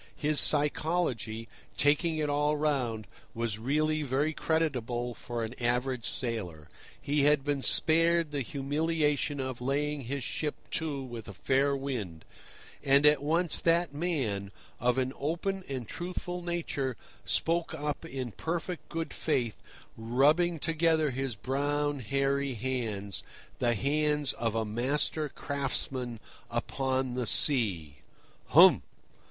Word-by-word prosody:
His 150 Hz, -1 st, +2 dB
psychology, 145 Hz, -7 st, +3 dB, 0.3 s
taking 155 Hz, +3 st, +2 dB
it 155 Hz, -1 st, 0 dB
all 145 Hz, +1 st, +1 dB
round, 130 Hz, -8 st, -1 dB, 0.3 s
was 115 Hz, -2 st, -2 dB
really 155 Hz, +5 st, +1 dB
very 145 Hz, +3 st, 0 dB
creditable 125 Hz, -8 st, -1 dB
for 120 Hz, 0 st, -5 dB
an 110 Hz, +1 st, -4 dB
average 125 Hz, 0 st, 0 dB
sailor. 90 Hz, -, -4 dB, 0.3 s
He 145 Hz, 0 st, +1 dB
had 150 Hz, -1 st, +4 dB
been 145 Hz, -1 st, -1 dB
spared 165 Hz, +2 st, +3 dB
the 145 Hz, -1 st, -2 dB
humiliation 145 Hz, +2 st, 0 dB
of 130 Hz, -2 st, -4 dB
laying 145 Hz, +3 st, -1 dB
his 135 Hz, +2 st, -4 dB
ship 150 Hz, +5 st, -2 dB, 0.2 s
to 150 Hz, -4 st, -1 dB
with 120 Hz, -3 st, -8 dB
a 100 Hz, -, -9 dB
fair 140 Hz, +1 st, +2 dB
wind; 110 Hz, -12 st, -5 dB, 0.6 s
and 140 Hz, +1 st, +5 dB
at 150 Hz, -1 st, +6 dB
once 165 Hz, +4 st, +1 dB
that 170 Hz, -2 st, +2 dB
man, 135 Hz, -, -2 dB, 0.3 s
of 125 Hz, +1 st, +1 dB
an 130 Hz, 0 st, 0 dB
open 175 Hz, +6 st, -2 dB
and 130 Hz, -5 st, -4 dB
truthful 180 Hz, 0 st, -5 dB
nature, 160 Hz, -8 st, -3 dB, 0.3 s
spoke 165 Hz, 0 st, 0 dB
up 150 Hz, 0 st, -3 dB
in 135 Hz, -7 st, -5 dB
perfect 170 Hz, -, -4 dB
good 165 Hz, -1 st, -4 dB
faith, 125 Hz, -9 st, -1 dB, 0.4 s
rubbing 145 Hz, +10 st, +2 dB
together 160 Hz, -1 st, +1 dB
his 130 Hz, -2 st, -3 dB
brown, 145 Hz, +5 st, -1 dB
hairy 135 Hz, +2 st, 0 dB
hands—the 115 Hz, -1 st, -3 dB
hands 150 Hz, +3 st, +1 dB
of 115 Hz, -1 st, -2 dB
a 110 Hz, 0 st, 0 dB
master 140 Hz, +7 st, 0 dB
craftsman 130 Hz, -4 st, -2 dB, 0.3 s
upon 130 Hz, +2 st, -1 dB
the 125 Hz, -2 st, -2 dB
sea: 95 Hz, -, +3 dB, 0.5 s
"Humph! -, -, +7 dB
140 Hz, 125 wpm, -30 LUFS, 120-155 Hz, 0.6 s, Humph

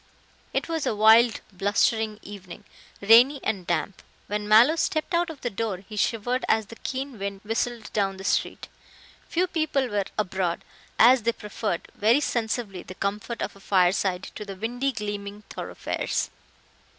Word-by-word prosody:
It -, -, -1 dB
was 325 Hz, -3 st, -2 dB
a -, -, 0 dB
wild, 220 Hz, +2 st, +6 dB
blustering 215 Hz, +3 st, +1 dB
evening, 195 Hz, -4 st, -10 dB, 0.4 s
rainy 240 Hz, +7 st, +6 dB
and 190 Hz, -5 st, -2 dB
damp. 180 Hz, +2 st, -2 dB, 0.2 s
When 210 Hz, 0 st, -3 dB
Mallow 230 Hz, +9 st, +7 dB
stepped 315 Hz, +1 st, -1 dB
out 340 Hz, 0 st, +2 dB
of 310 Hz, -4 st, -9 dB
the 245 Hz, -, -2 dB
door 200 Hz, -3 st, -3 dB
he 215 Hz, -, -8 dB
shivered 240 Hz, +4 st, 0 dB
as 220 Hz, -1 st, +3 dB
the 230 Hz, -, -11 dB
keen 265 Hz, -3 st, -5 dB
wind 200 Hz, 0 st, -4 dB
whistled 225 Hz, +1 st, -3 dB
down 195 Hz, -2 st, 0 dB
the 190 Hz, -, -9 dB
street. 200 Hz, -, -1 dB, 0.6 s
Few 355 Hz, +2 st, +1 dB
people 310 Hz, -7 st, 0 dB
were 205 Hz, -1 st, 0 dB
abroad, 190 Hz, -4 st, -1 dB, 0.3 s
as 245 Hz, +2 st, +7 dB
they 230 Hz, +2 st, +1 dB
preferred, 210 Hz, -4 st, -4 dB
very 225 Hz, +6 st, +3 dB
sensibly, 220 Hz, -7 st, -2 dB
the 185 Hz, -, -10 dB
comfort 210 Hz, +4 st, -3 dB
of -, -, -5 dB
a -, -, -15 dB
fireside 185 Hz, -1 st, +2 dB
to 210 Hz, -, -6 dB
the 200 Hz, -2 st, -7 dB
windy, 245 Hz, +7 st, -2 dB
gleaming 205 Hz, -2 st, -5 dB
thoroughfares. -, -, -3 dB
215 Hz, 160 wpm, -25 LUFS, 200-245 Hz, 0.6 s, Mallow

